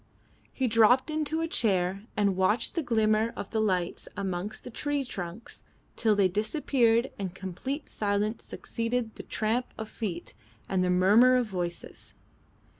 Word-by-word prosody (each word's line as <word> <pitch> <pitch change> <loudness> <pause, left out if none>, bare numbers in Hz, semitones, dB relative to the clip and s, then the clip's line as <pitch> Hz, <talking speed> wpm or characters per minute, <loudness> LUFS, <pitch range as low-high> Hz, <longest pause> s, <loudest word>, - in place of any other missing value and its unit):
He 265 - -1
dropped 245 +5 +4
into 310 +1 -1
a 330 - 0
chair 195 - 0
and 200 -2 +2
watched 190 +5 +2
the 335 - 0
glimmer 220 -3 +2
of - - -6
the 220 - 0
lights 185 -4 -1
amongst 195 +2 -3
the 250 - -8
tree 290 +3 -2
trunks 185 -1 -7 0.3
till 220 -2 +3
they 200 -2 +4
disappeared 230 - +1
and 190 -2 -4
complete 230 - -5
silence 210 +1 -1
succeeded 230 0 -3
the - - -8
tramp 230 +3 -1
of 220 -1 -6
feet 180 -7 -5 0.3
and 185 -1 +1
the 180 - +1
murmur 205 +8 +6
of 250 -1 +2
voices. 175 -4 -6
215 Hz, 150 wpm, -28 LUFS, 190-245 Hz, 0.3 s, murmur